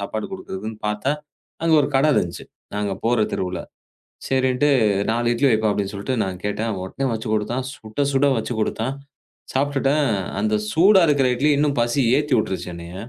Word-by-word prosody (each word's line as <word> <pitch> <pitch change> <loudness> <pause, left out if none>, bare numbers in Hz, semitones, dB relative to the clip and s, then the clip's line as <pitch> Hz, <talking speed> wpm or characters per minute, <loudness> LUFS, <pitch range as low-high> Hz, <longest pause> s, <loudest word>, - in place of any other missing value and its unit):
சாப்பாடு 110 +2 -4
குடுக்கிறதுன்னு 110 - -6
பார்த்தா 105 +7 0 0.5
அங்க 165 -1 +4
ஒரு - - 0
கடை 145 +3 +4
இருந்துச்சு. 85 -1 -1 0.3
நாங்க 105 -1 -1
போற 115 -1 +3
தெருவுல. 90 -2 -2 0.7
சரின்னுட்டு 130 +1 +2 0.4
4 120 +1 0
இட்லி 135 +4 +2
வைப்பா 110 -1 +2
அப்படின்னு 100 +5 -3
நான் 95 -1 -6
கேட்டேன். 110 +2 -2
உடனே 135 +8 -3
வச்சு 110 0 -4
குடுத்தான். 120 +5 -1
சுட 110 +3 -7
சுட 135 +1 +3
வச்சு 120 - -3
குடுத்தான். 115 +5 -1 0.6
சாப்பிட்டுட்டேன். 140 +1 +1 0.4
அந்தச் 105 0 0
சூடா 190 +4 +6
இருக்குற 140 -3 +3
இட்லி 150 +5 +2
இன்னும் 145 -2 +1
பசிய 120 +1 +2
ஏத்தி 150 - -1
உட்டுருச்சு 95 -3 -3
என்னைய. 85 +1 -9
120 Hz, 155 wpm, -22 LUFS, 105-140 Hz, 0.7 s, சூடா